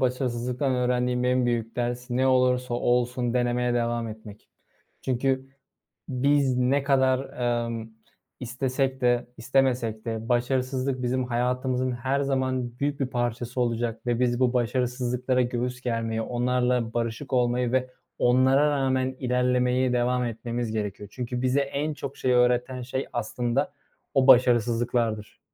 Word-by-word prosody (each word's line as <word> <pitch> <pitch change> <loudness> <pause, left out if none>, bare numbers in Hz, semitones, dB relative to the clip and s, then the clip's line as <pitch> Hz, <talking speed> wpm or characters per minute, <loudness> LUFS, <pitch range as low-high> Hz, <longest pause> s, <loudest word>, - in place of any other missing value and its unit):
başarısızlıktan 125 +1 -1
öğrendiğim 125 0 0
en 125 0 +2
büyük 115 -2 -2
ders 120 +1 -3
ne 130 +2 +2
olursa 125 -1 +2
olsun 120 0 0
denemeye 120 0 +1
devam 120 -1 -1
etmek. 110 -1 -11 0.5
Çünkü 130 +1 0 0.6
biz 135 0 +2
ne 130 +3 +2
kadar, 130 -2 +3 0.5
emm, 115 -1 -5 0.5
istesek 130 +2 -2
de 120 -1 +2
istemesek 120 -3 0
de 115 0 -4
başarısızlık 130 +1 0
bizim 130 +1 0
hayatımızın 125 +1 0
her 130 +3 -1
zaman 130 -3 -1
büyük 145 0 -1
bir 135 - 0
parçası 120 0 -2
olacak 115 -1 -2
ve 120 -1 0
biz 120 -1 +1
bu 130 -1 +2
başarısızlıklara 125 +1 0
göğüs 125 +1 -2
germeyi, 115 -2 -2
onlarla 125 -1 0
barışık 115 +4 -3
olmayı 125 -1 +1
ve 130 0 +1 0.3
onlara 130 +4 +4
rağmen 130 -2 0
ilerlemeye 125 0 +1
devam 125 +1 +1
etmemiz 115 0 -3
gerekiyor. 105 -2 -4
Çünkü 125 0 -4
bize 130 +2 +2
en 140 +2 -2
çok 140 -1 -7
şeyi 130 - +1
öğreten 125 +1 +2
şey, 130 +2 -4
aslında 120 +2 -1 0.4
o 135 0 +3
başarısızlıklardır. 120 -3 +3
125 Hz, 130 wpm, -26 LUFS, 120-130 Hz, 0.6 s, onlara